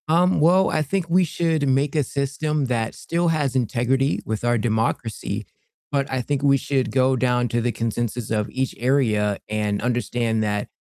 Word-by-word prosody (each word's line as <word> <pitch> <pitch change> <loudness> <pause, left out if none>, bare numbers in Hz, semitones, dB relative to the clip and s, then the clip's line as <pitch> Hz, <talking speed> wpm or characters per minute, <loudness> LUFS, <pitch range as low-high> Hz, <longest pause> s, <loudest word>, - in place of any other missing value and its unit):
Um, 175 +3 +3
well, 180 +5 +4
I - - 0
think 170 +3 -2
we 180 +2 +4
should 160 -3 0
make 135 +2 +1
a 150 - +3
system 145 +2 -2
that 115 -3 -2
still 170 +1 -1
has 145 -5 0
integrity 130 +3 +1
with 110 0 -3
our 120 0 +2
democracy, 110 0 -2 0.5
but 140 -1 0
I 130 -1 0
think 140 +2 -2
we 140 -1 +5
should 135 -1 -1
go 130 0 +3
down 125 -1 +1
to 120 +1 0
the 120 +1 0
consensus 115 0 -3
of 105 -1 0
each 130 0 -2
area, 110 -6 +1
and 105 -1 -1
understand 120 -2 0
that 105 -1 -1
130 Hz, 180 wpm, -22 LUFS, 115-145 Hz, 0.5 s, we